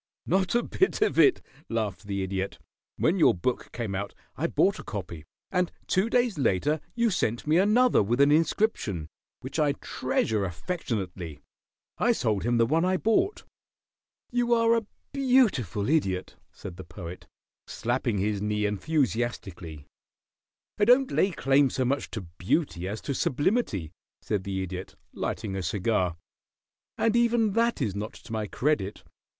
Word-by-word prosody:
"Not 190 +4 +1
a 240 - +3
bit 380 - +1
of 425 - +1
it," 395 - +5 0.3
laughed 105 -4 -3
the 100 -1 -2
Idiot. 95 0 -3 0.4
"When 180 +4 +2
your 160 - +5
book 120 +8 -2
came 115 -4 -4
out 100 +1 -4 0.2
I - - 0
bought - - +2
a - - -7
copy, 80 -2 -6 0.3
and 180 -1 +1
two 190 +5 +1
days 240 -8 +1
later 135 - +1 0.2
you 235 -2 +2
sent 120 - -1
me 155 +3 +4
another 235 +6 +4
with 115 +5 0
an 140 +1 +6
inscription, 150 - +1 0.3
which - - -5
I - - +3
treasure 110 -2 -1
affectionately. 90 - -4 0.6
I 240 - +4
sold 110 - 0
him 120 0 +2
the 115 - +4
one 160 +7 +2
I 185 +1 +2
bought." 360 - +1 0.9
"You 240 -1 +2
are 230 0 +4
a 225 -3 -1 0.3
beautiful 225 - +2
Idiot," 95 - 0 0.2
said 90 -3 -9
the 95 - -7
Poet, 90 0 -9 0.4
slapping 120 -2 -1
his 100 +1 0
knee 105 0 0
enthusiastically. 105 - -2 0.9
"I 205 - +4
don't 255 +3 +5
lay 195 - +3
claim 135 -5 +3
so 130 +1 -1
much 135 +3 -1
to 110 - -5 0.2
beauty 105 - 0
as 105 +3 -4
to 140 - -3
sublimity," 135 - 0 0.3
said 100 -3 -2
the 95 -1 -2
Idiot, 95 0 -6 0.2
lighting 105 -4 -3
a 95 - -2
cigar. 90 0 0 0.8
"And 225 0 +2
even 235 -2 +3
that 230 -6 +1
is 100 -5 -2
not 105 +2 -4
to 115 - -11
my 110 -1 -2
credit. 125 -6 -1
120 Hz, 155 wpm, -27 LUFS, -, 0.9 s, an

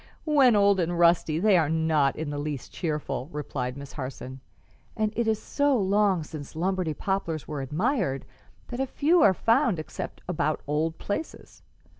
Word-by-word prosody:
"When 275 -7 +5
old 200 -1 +4
and 175 0 0
rusty, 170 -2 +3
they 200 +2 +4
are 155 -3 +1
not 160 -4 +2
in 155 -2 -4
the 145 - -3
least 145 -3 -5
cheerful," 150 -5 -3
replied 130 -4 -4
Miss 140 -1 -9
Harson; 130 -1 -7 0.6
"and 215 -1 0
it 235 0 0
is 220 -1 +1
so 285 +3 +1
long 195 -3 +2
since 150 -1 -9
Lombardy 180 -2 -1
poplars 170 -8 -2
were 150 -2 -4
admired 160 - -1 0.4
that 260 +2 -3
few 330 +6 +3
are 190 -8 +5
found 230 - +2
except 155 - -6
about 155 -3 -1
old 155 +3 -1
places. 205 +10 -6
170 Hz, 160 wpm, -26 LUFS, 150-210 Hz, 0.6 s, When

